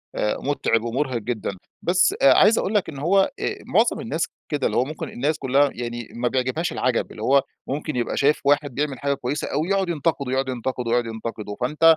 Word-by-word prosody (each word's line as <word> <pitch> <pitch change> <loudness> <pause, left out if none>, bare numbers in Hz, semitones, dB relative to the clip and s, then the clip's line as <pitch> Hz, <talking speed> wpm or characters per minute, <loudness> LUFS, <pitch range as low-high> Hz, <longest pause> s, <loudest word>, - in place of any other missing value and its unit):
آآ، 105 - 0
متعِب 125 -5 +1
ومُرهق 125 +2 -1
جدًا. 110 -3 -3 0.3
بس 180 - +3
عايِز 225 - +6
أقول 200 - 0
لك 205 - +2
إن 140 - -7
هو 180 +7 +3 0.2
آآ، - - -1
معظم 225 +5 +2
الناس 170 -7 -2 0.2
كده، 145 -3 +1
اللي - - -1
هو 125 - +3
ممكن 155 +2 -6
الناس 145 +5 -1
كلّها 140 +1 +3
يعني 120 -1 -5
ما 120 +1 0
بيعجِبهاش 130 +6 -1
العجَب، 125 -2 0
اللي - - -10
هو 140 0 +4 0.2
ممكن 150 +2 -3
يبقى 120 -1 -1
شايِف 145 +2 +3
واحد 145 -2 +2
بيعمل 145 -3 -2
حاجة 140 0 0
كويِسة 140 +1 -3
أوي، 155 +5 -1
يقعد 195 -2 +1
ينتقِده، 145 -4 -1
يقعد 130 0 0
ينتقِده، 125 -1 -3
يقعد 120 0 +2
ينتقِده. 110 -2 -5
فأنتَ 150 +6 -2
135 Hz, 200 wpm, -23 LUFS, 120-155 Hz, 0.3 s, عايِز